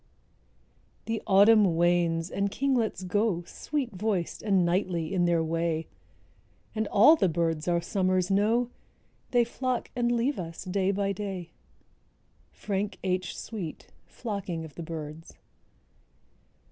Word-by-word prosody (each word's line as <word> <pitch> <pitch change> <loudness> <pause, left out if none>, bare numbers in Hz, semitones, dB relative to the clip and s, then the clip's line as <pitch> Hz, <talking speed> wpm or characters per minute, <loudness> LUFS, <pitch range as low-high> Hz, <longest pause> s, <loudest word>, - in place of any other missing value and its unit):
_) - - -37
The 225 0 -2
autumn 200 -2 +6
wanes, 170 -1 +2
and 200 0 0
kinglets 240 -6 0
go, 185 -1 0
Sweet 270 - -3
voiced 195 -3 -2
and 195 -4 +2
knightly 170 -1 0
in 180 -2 +2
their 170 -1 +2
way, 165 0 -1 0.9
And 220 -1 -1
all 245 +11 +7
the 195 - +2
birds 165 -1 -1
our 170 -1 +2
summers 185 0 0
know, 225 +5 +2 0.6
They 245 -1 +4
flock 250 +1 -3
and 240 -1 +1
leave 240 +3 0
us 165 -2 -6
day 190 +1 0
by 200 0 0
day. 190 -3 -5 1.0
—Frank 200 0 -3
H. 185 -1 -1
Sweet, 195 -9 -7 0.2
"Flocking 195 -8 -4
of 155 - -12
the - - -8
Birds." 160 -1 -7
190 Hz, 130 wpm, -28 LUFS, 170-215 Hz, 1.0 s, all